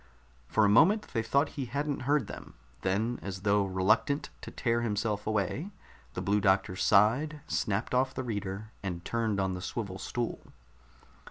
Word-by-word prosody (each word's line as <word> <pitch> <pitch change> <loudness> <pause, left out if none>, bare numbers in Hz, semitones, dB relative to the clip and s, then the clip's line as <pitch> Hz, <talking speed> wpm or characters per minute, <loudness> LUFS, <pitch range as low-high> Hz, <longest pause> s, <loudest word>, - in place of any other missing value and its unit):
For 110 - +3
a - - +5
moment 170 - +5
they 115 - +1
thought 140 +6 +2
he 135 - -4
hadn't 140 +3 -2
heard 145 -5 +3
them. - - -10 0.3
Then, 110 +6 0
as 95 -1 -6
though 100 0 +3
reluctant 110 +10 +1
to - - -7
tear 115 -1 0
himself 105 -2 -1
away, 110 - -1 0.5
the - - -3
Blue 105 +1 +2
Doctor 95 -2 +2
sighed, 120 +12 +3
snapped 105 +1 -1
off 130 +1 +2
the 130 - -2
reader, 105 -2 -4
and 90 -3 -5
turned 115 -3 0
on 95 -1 0
the 90 - -5
swivel 95 -1 -4
stool. 120 +3 -4
110 Hz, 165 wpm, -30 LUFS, 100-125 Hz, 0.5 s, a